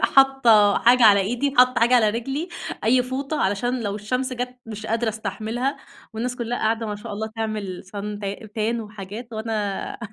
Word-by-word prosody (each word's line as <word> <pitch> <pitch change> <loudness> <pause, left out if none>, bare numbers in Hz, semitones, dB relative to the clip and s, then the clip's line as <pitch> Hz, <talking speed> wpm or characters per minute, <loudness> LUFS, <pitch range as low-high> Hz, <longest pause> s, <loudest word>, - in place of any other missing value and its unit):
حاطة 245 -7 +5
حاجة 245 +1 +5
على 200 -2 +7
إيدي، 245 +8 -1
حاطة 250 -1 +5
حاجة 240 +2 +4
على 220 -4 +5
رجلي، 270 - -3 0.4
أي 250 +3 +4
فوطة 275 +4 -3
علشان 240 +6 0
لو 205 -2 -2
الشمس 250 +5 -2
جت 250 0 -4
مش 215 -1 -7
قادرة 225 +1 0
أستحملها. 220 +4 -3 0.4
والناس 245 +3 -3
كلها 240 0 -3
قاعدة 225 +1 0
ما 210 -1 -3
شاء 210 +1 -8
الله 220 +2 -3
تعمل 215 -4 -3
Sun 205 +2 -6
ت - - -6 0.3
Tan 230 +2 0
وحاجات 210 +2 -8
وأنا 215 -3 -3
225 Hz, 170 wpm, -23 LUFS, 210-250 Hz, 0.4 s, على